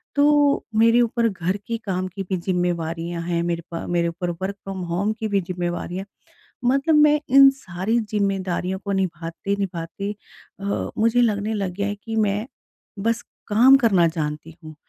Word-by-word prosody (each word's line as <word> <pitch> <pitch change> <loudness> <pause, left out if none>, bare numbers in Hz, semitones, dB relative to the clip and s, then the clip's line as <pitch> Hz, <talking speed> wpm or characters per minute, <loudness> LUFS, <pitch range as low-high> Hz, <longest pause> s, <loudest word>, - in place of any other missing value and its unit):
तो 290 0 +4
मेरे 230 +2 +5
ऊपर 235 0 +1
घर 185 -1 -2
के 230 -1 -1
काम 185 -2 -1
की 195 +2 -6
भी 190 0 -2
ज़िम्मेवारियों 170 -1 -2
हैं, 170 0 -1
मेरे 170 -1 -2
प 165 - -4
मेरे 170 -1 +1
ऊपर 175 +1 -4
वर्क 195 +1 -2
फ्रॉम 195 -1 -5
होम 200 +5 0
की 220 - -1
भी 200 -1 +2
ज़िम्मेवारियाँ 175 +1 -4 0.6
मतलब 275 +5 +3
मैं 300 0 +5
इन 275 +1 +8
सारी 205 -1 -2
ज़िम्मेदारियों 195 -3 -1
को 200 - -2
निभाते-निभाते 190 +1 -3 0.5
अ, 200 0 -2
मुझे 230 +2 +3
लगने 215 -1 +1
लग 195 -4 -2
गया 200 +1 -1
है 205 - -2
कि 225 -1 -4
मैं 210 0 +1 0.5
बस 230 +3 0 0.3
काम 240 +6 +6
करना 190 -7 +5
जानती 155 -1 -4
हूँ, 155 0 -10
195 Hz, 160 wpm, -23 LUFS, 175-225 Hz, 0.6 s, इन